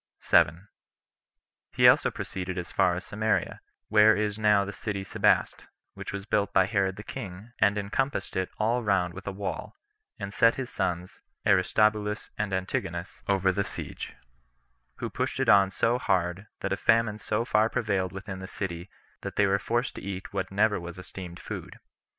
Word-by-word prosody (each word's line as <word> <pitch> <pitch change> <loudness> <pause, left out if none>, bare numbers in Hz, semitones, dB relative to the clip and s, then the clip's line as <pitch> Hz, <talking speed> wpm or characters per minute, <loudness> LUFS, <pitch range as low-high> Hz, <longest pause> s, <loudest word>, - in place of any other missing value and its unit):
7. 85 +7 +3 1.1
He - - +6
also - - +6
proceeded 90 -1 -5
as 90 - -4
far 90 -1 +3
as 90 - -6
Samaria, 110 +2 -1 0.3
where 110 0 +6
is 105 0 -1
now 105 -2 +4
the 100 - -6
city 100 0 -4
Sebaste, 95 - +1 0.3
which - - -7
was 100 -1 -5
built 105 -2 +1
by 95 -2 +4
Herod 95 -2 0
the 105 - -9
king, 100 +2 -8
and 100 +2 +4
encompassed 105 +2 -2
it 95 -1 0
all 115 +3 +1
round 95 -5 +1
with 95 +1 -10
a - - -1
wall, 100 0 -5 0.4
and 100 -2 -6
set 115 0 +5
his 130 -2 -5
sons, 90 -2 -2 0.3
Aristobulus 105 +2 +2
and 105 -1 -2
Antigonus, 95 -2 -3
over 95 -1 +3
the 100 +2 0
siege; - - -7 0.8
who - - -4
pushed - - -3
it - - +2
on 100 -1 +7
so 115 +5 +1
hard, 90 -1 0
that - - -1
a - - -1
famine 115 -2 +2
so 110 +2 -1
far 110 -1 +3
prevailed 100 -6 0
within 95 0 -7
the 95 - -7
city, 90 -3 -5 0.3
that - - -6
they 100 - +4
were 100 0 +2
forced 120 +4 -1
to - - -6
eat 95 0 -6
what 95 -2 -2
never 105 +2 +2
was 85 +1 -8
esteemed 90 -1 -8
food. - - -7
100 Hz, 175 wpm, -28 LUFS, 95-105 Hz, 1.1 s, on